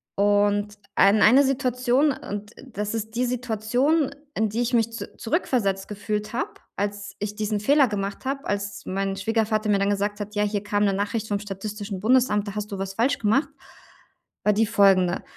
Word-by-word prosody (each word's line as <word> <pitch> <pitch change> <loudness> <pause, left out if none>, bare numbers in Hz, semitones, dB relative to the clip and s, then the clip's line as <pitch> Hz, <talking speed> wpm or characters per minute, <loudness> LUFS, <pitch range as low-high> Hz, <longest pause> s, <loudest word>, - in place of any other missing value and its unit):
Und 205 +1 +2 0.2
ein 200 +2 +5
einer 260 +6 +7
Situation, 260 +1 +2
und 205 -4 -6
das 210 -3 -4
ist 220 0 -4
die 250 - +1
Situation, 250 +5 0 0.2
in 220 -1 +1
die 230 +4 -2
ich 240 +1 -1
mich 230 -1 +2
zu 230 - -8
zurückversetzt 225 - 0
gefühlt 210 +1 -4
habe, 375 - -2 0.2
als 200 -1 -4
ich 205 0 -4
diesen 210 0 -1
Fehler 280 +3 +4
gemacht 200 +2 -4
habe, 275 +1 -3
als 200 -1 -3
mein 195 +1 -2
Schwiegervater 215 +1 0
mir 200 -1 +3
dann 200 0 +1
gesagt 205 +1 -1
hat: 210 +1 -6
„Ja, 210 - +2
hier 205 -1 -1
kam 210 0 0
'ne 195 - +2
Nachricht 210 +2 -2
vom 205 -1 0
Statistischen 205 0 -6
Bundesamt, 220 -2 +3
da 200 - -8
hast 210 0 -4
du 200 - -4
was 195 0 -4
falsch 255 +7 +1
gemacht.“ 270 +6 +2 1.0
war 210 - +5
die 220 +2 +3
folgende, 195 -4 +3
210 Hz, 185 wpm, -24 LUFS, 205-235 Hz, 1.0 s, einer